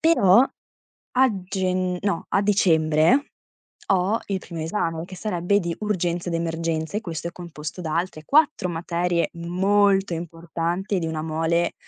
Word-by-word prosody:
Però 230 - +5 0.7
a 260 0 +4
genn 185 -1 -1
no, 200 -4 -1
a 195 - +2
dicembre 165 - +3 0.7
ho 195 +3 +2
il 195 -1 -1
primo 170 -3 -8
esame. 165 -1 -2
che 185 +1 -10
sarebbe 200 0 0
di 170 -2 -2
urgenza 175 -4 -1
ed 170 - -2
emergenza 165 +1 -2
e - - 0
questo 170 -5 -5
è - - -9
composto 170 -2 -7
da 160 -3 -3
altre 170 -3 -3
4 295 - +3
materie 170 0 -1
molto 195 +3 +2
importanti 170 +3 -3
e - - +2
di 165 - -2
una 160 -1 -3
mole 165 +2 0
175 Hz, 150 wpm, -24 LUFS, 165-195 Hz, 0.7 s, Però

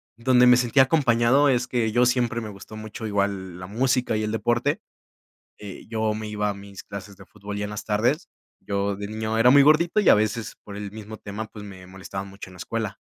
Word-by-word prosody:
donde 125 +1 +4
me 125 0 +7
sentía 125 +2 +4
acompañado 135 -1 +3
es, 125 -1 +1
que 115 -3 0
yo 120 +2 +4
siempre 120 -2 +1
me 110 -2 -6
gustó 100 +2 -11
mucho 110 +1 -7
igual 100 -3 -2
la 90 - -7
música, 125 +2 0
y 110 - -1
el 105 - -2
deporte, 120 +5 0 0.8
eh, 100 -2 -10
yo 110 -1 -1
me 110 0 -5
iba 105 0 -1
a - - -1
mis 100 -1 -11
clases 100 0 -9
de 100 - -14
fútbol 105 0 -8
ya 105 - -2
en - - -6
las 105 -1 -6
tardes, 120 - 0 0.3
yo 100 0 -2
de 100 0 -6
niño 110 +1 -3
era 120 +2 +6
muy 140 +1 +8
gordito, 165 +7 +4
y - - +4
a - - +9
veces 110 +1 -1
por 100 - -9
el 105 -1 -6
mismo 110 0 -9
tema, 105 +2 -6
pues, 105 -1 -11
me 95 -2 -11
molestaban 95 +1 -7
mucho 95 -1 -10
en - - -14
la - - -13
escuela. 110 +2 -4
110 Hz, 230 wpm, -24 LUFS, 100-120 Hz, 0.8 s, a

